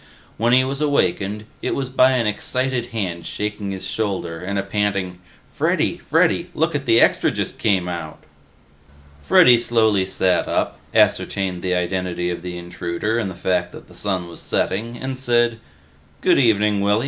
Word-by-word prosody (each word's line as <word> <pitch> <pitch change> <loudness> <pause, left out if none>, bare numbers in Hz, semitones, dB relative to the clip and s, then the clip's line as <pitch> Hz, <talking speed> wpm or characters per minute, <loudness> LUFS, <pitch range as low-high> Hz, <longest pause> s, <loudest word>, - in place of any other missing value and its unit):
When 115 +2 +1
he 130 +1 +5
was 135 +2 -3
awakened, 105 -7 0 0.2
it - - -1
was 135 -2 -3
by 130 0 +4
an 125 -3 +1
excited 125 +3 -1
hand 95 -8 -4
shaking 105 -1 -4
his 95 -1 -5
shoulder 95 -4 -3
and 100 +3 -3
a 100 - 0
panting, 100 -3 -2 0.3
"Freddy! - - 0
Freddy! - - +1
Lookit 150 -3 0
the 115 0 +5
Extra - - +4
just - - -4
came 95 -4 +1
out!" 85 -3 -5 1.0
Freddy 120 - +6
slowly 110 -5 +2
sat 95 -1 +1
up, - - -1
ascertained 95 -3 +1
the 90 -1 0
identity 90 0 -1
of 85 - -5
the 90 0 -6
intruder 85 +5 -3
and 105 -5 -2
the 95 - -8
fact 90 -1 -1
that - - -12
the - - -17
sun 95 -4 -2
was 85 - -9
setting, 115 +5 -1
and 130 0 -4
said, 120 -2 +2 0.6
"Good - - +4
evening, 105 -4 +3
Willy. 100 +2 +2
100 Hz, 165 wpm, -21 LUFS, 90-120 Hz, 1.0 s, Freddy